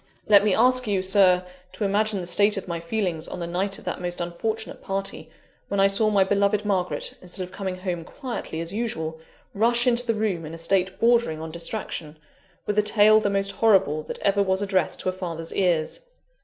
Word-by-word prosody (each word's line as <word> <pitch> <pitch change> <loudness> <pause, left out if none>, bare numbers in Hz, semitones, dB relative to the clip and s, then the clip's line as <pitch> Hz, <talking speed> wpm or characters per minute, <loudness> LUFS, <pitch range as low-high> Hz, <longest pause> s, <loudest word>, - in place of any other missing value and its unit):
"Let 205 -1 +6
me 210 -3 +2
ask 255 +1 +3
you, 195 -3 0
Sir, 185 -1 +4 0.3
to - - -4
imagine 205 0 +1
the - - -6
state 205 +4 +3
of 195 - -5
my 170 -1 -3
feelings 170 -2 -2
on 180 - -7
the 170 - -3
night 190 +3 -2
of - - -15
that - - -4
most 175 0 -3
unfortunate 215 +6 -4
party, 195 0 -4 0.4
when 200 - -2
I 195 - +5
saw 200 +2 +4
my 200 -2 +4
beloved 200 +2 +1
Margaret, 185 -3 -1
instead 180 +1 -4
of 180 - -9
coming 190 -1 -4
home 180 -2 -4
quietly 235 - -6
as 165 +2 -4
usual, 160 -8 -3 0.3
rush 235 +3 +3
into 245 0 +3
the 230 - +1
room 205 -6 -1
in 160 +1 -7
a - - -8
state 185 +2 0
bordering 230 -9 +2
on 160 0 -6
distraction, 170 -3 -4 0.5
with 210 0 +1
a - - +6
tale 210 0 +5
the 205 - 0
most 195 0 0
horrible 190 -8 +3
that - - -6
ever 200 0 +2
was 190 0 +1
addressed 190 -4 0
to - - -1
a - - 0
father's 170 -3 -6
ears. 175 - 0
195 Hz, 210 wpm, -24 LUFS, 175-210 Hz, 0.5 s, Let